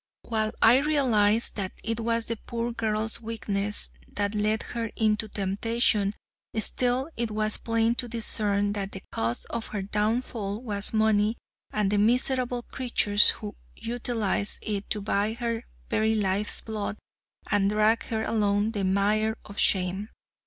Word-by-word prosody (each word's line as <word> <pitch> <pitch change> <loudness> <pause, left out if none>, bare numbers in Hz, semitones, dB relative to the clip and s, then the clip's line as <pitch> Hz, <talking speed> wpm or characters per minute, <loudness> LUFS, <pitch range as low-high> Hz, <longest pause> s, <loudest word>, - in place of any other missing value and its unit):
While 220 -2 -1
I 230 +3 +8
realized 240 -8 +2
that 190 -2 -3
it 225 0 -2
was 230 0 0
the 230 - -3
poor 235 0 -2
girl's 220 -1 -2
weakness 210 -2 -1 0.2
that 205 0 -2
led 215 +1 0
her 230 -1 -4
into 215 0 +1
temptation, 205 +1 0 0.4
still 250 +6 +3
it 235 -1 -1
was 215 0 +1
plain 230 0 +1
to 245 - -7
discern 205 -3 +1
that 200 -1 -4
the 190 - -8
cause 115 +1 -2
of 235 -1 -3
her 205 -2 -4
downfall 210 +1 -2
was 205 -4 0
money 220 0 +2 0.3
and 210 -2 0
the 205 - +2
miserable 245 +2 +2
creatures 225 -6 +3
who 210 -1 -3 0.2
utilized 230 -3 -1
it 205 -2 -3
to 210 - -1
buy 205 +1 0
her 235 0 -3 0.2
very 220 0 +1
life's 205 0 +2
blood 215 -2 -4 0.5
and 200 -1 +3
drag 215 +2 +2
her 220 -1 -2
along 210 -1 +1
the 205 -3 -2
mire 210 +3 +1
of 200 - -8
shame. 190 +2 +1
215 Hz, 145 wpm, -27 LUFS, 205-230 Hz, 0.5 s, I